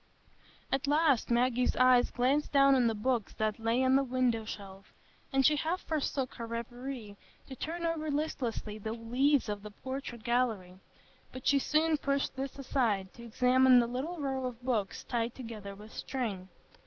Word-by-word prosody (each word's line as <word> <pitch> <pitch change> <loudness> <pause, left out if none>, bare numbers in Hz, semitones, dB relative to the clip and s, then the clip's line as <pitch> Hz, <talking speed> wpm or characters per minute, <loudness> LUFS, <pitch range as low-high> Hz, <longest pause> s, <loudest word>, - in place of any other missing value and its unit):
At 270 +1 0
last 295 -4 +3
Maggie's 245 +1 +2
eyes 255 -1 +5
glanced 270 +5 +1
down 275 -1 +6
on 250 -3 +4
the 225 - 0
books 230 0 -1
that 215 0 -1
lay 230 +3 +1
on 260 0 +4
the 275 - +4
window 250 -3 0
shelf, 195 -2 -9 0.4
and 270 -1 +3
she 305 - +5
half 330 +5 -1
forsook 280 -4 -2
her 230 - -6
reverie 235 -2 -6 0.3
to 265 - -9
turn 335 +5 -4
over 320 -2 -1
listlessly 250 -8 -3
the 220 +1 -4
leaves 250 +5 +1
of 205 -1 -3
the 210 - -8
"Portrait 250 +1 -7
Gallery," 225 -7 0 0.5
but 255 - -9
she 280 - +4
soon 310 +3 +2
pushed 275 -1 -1
this 270 0 -5
aside 225 -8 0
to 235 - -12
examine 250 +2 +4
the 240 - +5
little 270 +9 -4
row 265 -2 -2
of 245 -1 -8
books 225 -7 -1
tied 235 -1 -2
together 215 -5 -8
with 210 +2 -13
string. 205 -8 -4
250 Hz, 170 wpm, -31 LUFS, 225-275 Hz, 0.5 s, down